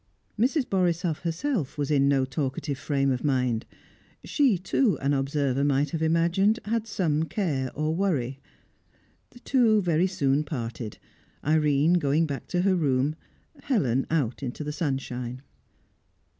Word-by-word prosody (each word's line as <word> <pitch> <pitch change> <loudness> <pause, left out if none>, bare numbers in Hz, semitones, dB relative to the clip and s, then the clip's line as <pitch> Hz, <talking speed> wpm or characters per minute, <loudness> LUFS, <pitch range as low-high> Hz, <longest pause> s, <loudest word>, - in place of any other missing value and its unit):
Mrs. 260 +4 +2
Borisoff 175 -4 0
herself 170 - -2
was 145 0 -1
in 140 -2 +3
no 135 -2 +3
talkative 135 +1 -3
frame 140 -2 0
of 125 - -2
mind. 125 -5 0 0.6
She, 270 - +2
too, 205 +5 +1
an 140 +1 +1
observer 140 -1 0
might 140 0 +1
have 160 - -3
imagined, 170 +6 +2
had 225 +1 -1
some 160 -8 0
care 150 -9 -1
or 155 +2 0
worry. 145 -9 -1 0.9
The 245 - -17
two 235 -6 +3
very 175 -1 +2
soon 145 -5 +1
parted; 120 -6 -5 0.5
Irene 155 +2 +3
going 150 +2 +2
back 140 -3 -5
to 180 - 0
her 195 0 +3
room, 145 -2 +1 0.5
Helen 135 - +1
out 145 -7 0
into 135 +3 -4
the 150 0 -4
sunshine. 130 -4 -3
150 Hz, 140 wpm, -26 LUFS, 135-180 Hz, 0.9 s, in